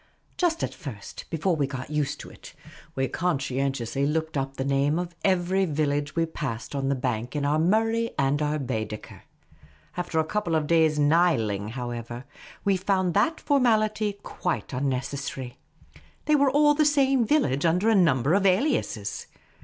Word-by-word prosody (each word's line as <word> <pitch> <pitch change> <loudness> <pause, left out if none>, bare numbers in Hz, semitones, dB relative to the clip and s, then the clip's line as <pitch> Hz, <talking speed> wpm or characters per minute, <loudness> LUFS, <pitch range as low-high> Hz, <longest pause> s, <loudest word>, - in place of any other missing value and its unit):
Just 335 -2 0
at - - -2
first, 130 - -9
before 170 +2 0
we 145 -3 0
got 135 0 -6
used 150 -1 -1
to - - -11
it, - - -14 0.4
we 135 0 0
conscientiously 135 -4 -1
looked 160 +2 -1
up 135 0 -2
the 135 - -2
name 140 +2 +1
of 175 -1 -3
every 190 0 +2
village 145 -3 -1
we 165 -1 +2
passed 135 -8 -5
on 135 -1 -1
the 140 - +2
bank 125 0 -3
in 145 -1 -1
our 150 +2 +2
Murray 225 +6 +2
and 140 +2 +1
our 150 0 0
Baedeker. 110 -6 -5 0.7
After 175 -2 -3
a - - +3
couple 175 0 -1
of 155 -1 +1
days' 160 -1 +3
Niling, 145 - +2
however, 120 0 -5 0.4
we 195 -1 +3
found 185 -1 0
that 315 - +2
formality 215 -6 +2
quite 175 -5 -3
unnecessary. 135 -1 -3 0.7
They 305 - +2
were 280 -1 +4
all 295 +2 +4
the 305 +1 +3
same 275 -4 +3
village, 215 - +1
under 175 +5 +2
a 225 - +5
number 155 - +3
of 200 +1 +3
aliases. 185 - 0
155 Hz, 160 wpm, -26 LUFS, 135-195 Hz, 0.7 s, a